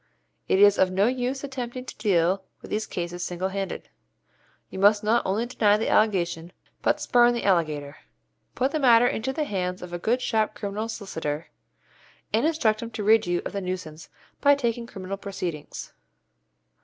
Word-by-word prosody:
It - - +3
is 205 0 +6
of 190 - +4
no 190 +2 +2
use 255 +2 -1
attempting 255 -2 -5
to - - -8
deal 190 -2 +2 0.2
with - - -12
these 215 +1 -1
cases 175 0 -4
single 180 +2 -2
handed. 195 0 -4 0.8
You - - -6
must 205 +2 +5
not 225 +3 +2
only 205 +5 0
deny 210 -4 +3
the 220 - -1
allegation, 175 -5 +1 0.3
but - - +1
'spurn 240 -1 +4
the 235 - -3
allegator.' 155 -6 0 0.6
Put 260 +2 +1
the 310 - -1
matter 240 -3 +6
into 245 +1 0
the 305 +3 -1
hands 180 -8 -3
of 175 -1 -9
a 175 - -3
good 235 +7 +1
sharp 220 -3 0
criminal 210 +1 -4
solicitor, 160 -8 -4 0.8
and 230 +8 +3
instruct 230 -10 +1
him 230 - -5
to 220 -2 -5
rid 220 0 +4
you 175 0 0
of - - -3
the 200 - -2
nuisance 180 -4 -6 0.3
by 285 0 +6
taking 235 -3 -2
criminal 195 -2 -6
proceedings. 190 -6 -6
205 Hz, 175 wpm, -25 LUFS, 180-235 Hz, 0.8 s, is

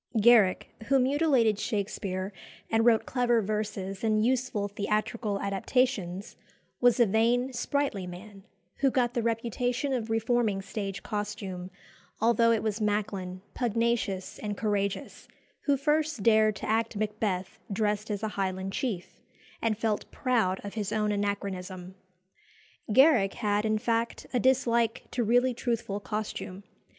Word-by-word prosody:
Garrick, 215 -4 +5 0.2
who 275 - +4
mutilated 260 -5 +3
Shakespere 195 -2 -2 0.4
and 225 0 +3
wrote 230 -2 +4
clever 245 -2 +2
verses 205 -2 -3
and 215 -1 +2
useful 245 -5 0
theatrical 210 +1 -1
adaptations, 200 -2 -1 0.4
was 245 0 +4
a 240 - +7
vain, 235 +5 +2
sprightly 245 -6 -1
man, 195 +3 -10 0.4
who 275 - +3
got 245 -2 +1
the 240 - 0
reputation 240 +4 -1
of 230 -3 -2
reforming 225 -3 +1
stage 195 -2 -5
costume, 200 -4 -4 0.5
although 230 +1 +4
it 225 -2 +1
was 215 0 -1
Macklin, 195 -3 -2
pugnacious 230 -5 -1
and 205 -2 -4
courageous, 200 -2 -2 0.4
who 285 -1 +3
first 300 -4 0
dared 215 -1 +4
to - - -6
act 225 +1 0
Macbeth 205 -3 -2
dressed 210 +1 0
as 205 0 -3
a 220 - 0
Highland 190 -1 -3
chief, 210 -9 -4 0.4
and 220 -2 +1
felt 220 -2 -1
proud 225 -8 +1
of 200 - -6
his 210 -2 -3
own 210 -1 +1
anachronism. 195 -3 -3 1.0
Garrick 250 -5 +5
had, 210 -1 0
in 215 0 +2
fact, 230 +1 -1
a 250 - +2
dislike 235 -3 +2
to 245 - 0
really 245 +3 +3
truthful 230 -4 -2
costume. 205 -2 -5
215 Hz, 135 wpm, -28 LUFS, 200-240 Hz, 1.0 s, a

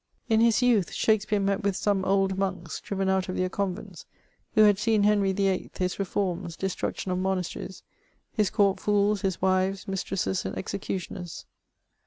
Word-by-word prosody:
In 220 -1 +4
his 230 +2 +4
youth, 225 -8 +3
Shakspeare 215 -1 +2
met 195 0 0
with 200 -2 0
some 200 -1 +1
old 195 0 +2
monks, 185 -4 -3
driven 195 -1 -2
out 190 -1 +1
of 185 - -3
their 185 0 0
convents, 190 -1 -4 0.5
who 215 - +7
had 205 -2 +5
seen 215 -1 +2
Henry 205 -2 +3
VIII., 195 -1 0
his 180 +1 -1
reforms, 185 -3 -2
destruction 190 0 -3
of 180 - 0
monasteries, 190 0 -3 0.5
his 210 -5 +2
court 200 -3 +2
fools, 205 -1 +2
his 190 -2 -2
wives, 190 +1 +1
mis 195 -1 -2
tresses, 190 -1 -1
and - - -4
executioners. 185 -2 -5
195 Hz, 165 wpm, -27 LUFS, 185-205 Hz, 0.5 s, who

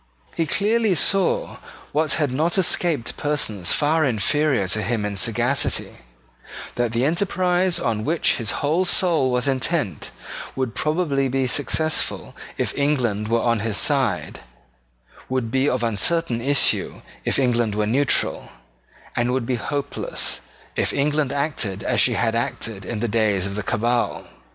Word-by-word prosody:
He 165 - 0
clearly 210 +3 +2
saw 195 +2 +1 0.3
what 155 -1 +1
had 145 -5 0
not 160 +8 0
escaped 165 -8 +1
persons 110 - 0
far 155 +2 +2
inferior 135 -1 +1
to 110 - 0
him 115 -2 -1
in 105 -1 -3
sagacity, 95 - 0 0.8
that 120 -2 -1
the 120 +3 0
enterprise 180 +2 +1
on 110 -2 -1
which 160 +7 +1
his 115 -4 -3 0.2
whole 165 +6 +2
soul 165 -7 +2
was 125 +1 0
intent 135 - -1 0.5
would 130 -4 -2
probably 150 - +1
be 130 0 0
successful 145 +5 0 0.2
if - - -2
England 125 -8 0
were 115 +1 +1
on 115 -2 +2
his 110 -1 -1
side, 125 - +1 0.9
would 130 -3 -2
be 135 +2 +2
of 125 -1 -1
uncertain 120 - +1
issue 140 +3 +1 0.2
if - - 0
England 120 -5 +1
were 105 0 +1
neutral, 135 +6 +1 0.7
and 120 +1 +1
would 130 -2 -1
be 130 - -1
hopeless 140 +4 -3 0.3
if - - 0
England 145 0 0
acted 140 -9 -2
as - - +1
she - - +3
had 115 -1 0
acted 115 -3 -3
in 110 -3 -4
the 120 - 0
days 105 -4 +1
of 100 - -4
the 105 - -3
Cabal. 120 +4 -1
130 Hz, 145 wpm, -22 LUFS, 115-155 Hz, 0.9 s, she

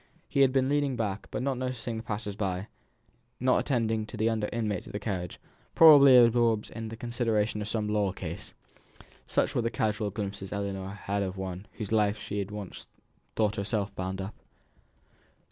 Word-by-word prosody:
He - - -1
had 135 -1 +6
been 130 0 +2
leaning 145 -1 +1
back, 105 -4 -3
not 130 -1 -1
noticing 125 -2 -3
the - - -4
passers 105 -2 -4
by, 95 0 -3 0.7
not 130 +1 +3
attending 110 -5 0
to 115 - -8
the 110 +2 +2
other 110 -2 -1
inmates 110 -5 -2
of - - -10
the 105 - -2
carriage, 95 -4 -4 0.4
probably 140 -5 +9
absorbed 115 -2 +4
in 115 -1 -6
the 115 - -8
consideration 115 -3 0
of 105 - -4
some 110 -1 -1
law 105 -2 +1
case. 85 -3 -7 0.7
Such - - +1
were - - +1
the 115 - 0
casual 105 -2 -1
glimpses 100 -1 -5
Ellinor 100 -2 -3
had 100 +1 -1
of 95 -1 -3
one 95 +1 -5
with - - -26
whose 105 -2 -5
life 105 -1 +2
she 105 0 -4
had 100 -1 -3
once 105 -3 -8 0.5
thought 105 0 +1
herself 100 0 -1
bound 95 +1 -4
up. 95 +3 -5
105 Hz, 180 wpm, -29 LUFS, 100-115 Hz, 0.7 s, probably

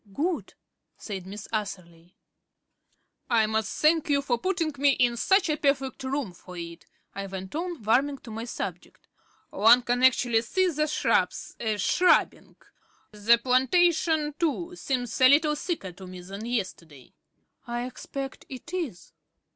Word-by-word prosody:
"Good," 325 - -2 0.4
said 190 -4 -7
Miss 205 +2 -8
Atherley. 180 -5 -5 1.1
"I 230 -3 +4
must 220 -1 -2
thank 310 0 +3
you 280 -1 +2
for 245 -4 0
putting 340 -1 -1
me 280 0 +4
in 245 -2 +2
such 385 - +3
a 305 - +1
perfect 275 -3 0
room 265 -5 -2
for 180 +1 -12
it," 170 0 -8 0.3
I 195 0 -5
went 190 0 -7
on, 335 -4 -4
warming 270 +6 +2
to 230 - -10
my 225 +2 -5
subject. 240 - -7 0.4
"One 230 +5 +6
can 245 +1 0
actually 245 -3 +4
see 370 +10 +1
the 305 0 0
shrubs 305 - 0
er 220 -2 -1
shrubbing. 355 - +2 0.6
The 215 +3 +4
plantation 305 +5 +2
too 340 +2 -1
seems 250 -7 -3
a 255 - +8
little 300 +2 +4
thicker 300 - -4
to 185 +1 -12
me 180 0 -9
than 195 +5 -8
yesterday." 175 - -5 0.5
"I 240 +1 -3
expect 270 +1 -7
it 265 +6 -10
is." 295 - -5
245 Hz, 145 wpm, -27 LUFS, 210-300 Hz, 1.1 s, a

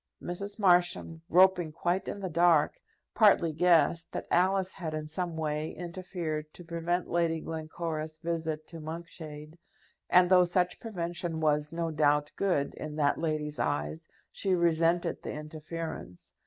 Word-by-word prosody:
Mrs. 200 +3 -5
Marsham, 175 -4 +2
groping 180 -2 +5
quite 175 +4 -1
in 205 - -5
the 190 - -2
dark, 170 - +3 0.3
partly 195 -7 +5
guessed 170 0 +3
that - - -4
Alice 190 +1 +2
had 160 -4 -5
in 155 0 -4
some 170 +1 -3
way 155 0 -2
interfered 170 -3 -5
to 175 - -10
prevent 170 +1 -2
Lady 165 -1 +1
Glencora's 160 0 -4
visit 160 -2 -3
to 165 - -8
Monkshade, 160 -1 -8 0.5
and, 180 0 +6
though 180 -1 +7
such 180 0 0
prevention 175 -5 -4
was, 150 -1 +1
no 165 0 -2
doubt, 150 -1 +2
good 175 -8 0
in 155 -1 -7
that 145 -2 +1
lady's 155 -2 -2
eyes, 155 +2 -2 0.2
she 190 -2 0
resented 170 0 +2
the - - -5
interference. 155 - -7
165 Hz, 140 wpm, -30 LUFS, 155-175 Hz, 0.5 s, though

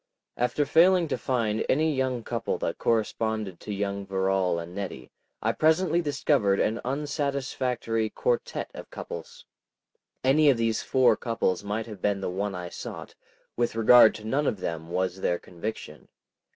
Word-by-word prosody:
After 125 +4 0
failing 175 +3 +5
to - - 0
find 115 -5 0
any 155 +3 +2
young 130 -3 -1
couple 115 0 -2
that - - -3
corresponded 110 -4 -1
to - - -7
young 100 0 -2
Verrall 95 -2 0
and 85 +1 -6
Nettie, 90 -10 -6 0.3
I - - +2
presently 165 +2 +2
discovered 140 - +1
an 110 +2 0
unsatisfactory 135 -5 -2
quartette 120 +2 -2
of - - -9
couples. 85 - -8 0.8
Any 145 +3 +5
of 135 - +4
these 115 -1 0
four 130 -1 +4
couples 115 -6 -1
might 105 +2 -3
have 105 -5 -10
been 100 -1 +1
the 95 - -3
one 100 +1 -2
I 90 -1 -5
sought; - - -8 0.4
with 120 -1 0
regard 115 0 +7
to 110 - -9
none 140 +6 0
of 100 - -1
them 80 -2 -4
was 95 +1 -2
there 85 - +1
conviction. 85 -4 -7
110 Hz, 155 wpm, -27 LUFS, 95-130 Hz, 0.8 s, regard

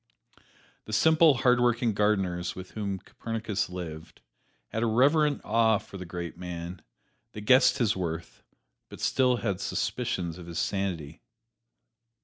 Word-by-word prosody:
The 110 - -7
simple, 160 +3 +5
hard 125 0 +5
working 120 -1 +2
gardeners 95 -4 0
with 95 0 -9
whom 100 -3 -3
Copernicus 110 +1 -4
lived, 85 -3 -8 0.5
had 110 - -3
a 115 - +2
reverent 145 +6 +3
awe 110 0 +3
for 100 - -10
the 90 - -7
great 85 0 -5
man; 90 0 -6 0.5
they 105 - -7
guessed 130 +6 +5
his 115 -6 +2
worth, 85 -2 -5 0.5
but - - -11
still 130 -1 +2
had 100 -4 -2
suspicions 85 -1 -2
of 85 - -10
his 85 -1 -6
sanity. 85 -5 -2
100 Hz, 135 wpm, -28 LUFS, 90-120 Hz, 0.5 s, simple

